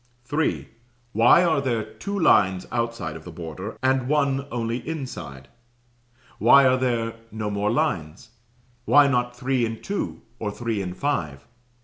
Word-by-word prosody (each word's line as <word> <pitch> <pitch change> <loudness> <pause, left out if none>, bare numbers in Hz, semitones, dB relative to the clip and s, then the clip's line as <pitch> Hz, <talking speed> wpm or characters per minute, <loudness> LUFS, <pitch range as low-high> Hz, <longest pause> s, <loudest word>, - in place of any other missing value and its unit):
Why 120 - +6
are 160 -5 +2
there 120 -5 -1
two 110 - -6
lines 95 - +3
outside 115 -9 -2
of 80 - -9
the 90 - -9
border, 85 +5 -7
and 130 -1 +2
one 140 -2 +1
only 115 0 -2
inside? 105 - -7 0.9
Why 140 0 +7
are 130 0 +4
there 115 -3 -1
no 110 -1 -3
more 100 +1 0
lines? 90 - -2 0.6
Why 145 0 +6
not 125 -2 0
three 130 -1 0
and 115 -1 -3
two, 200 0 -4 0.2
or 105 - -2
three 110 -1 -3
and 90 -1 -5
five? 75 - -2
115 Hz, 140 wpm, -24 LUFS, 100-135 Hz, 0.9 s, Why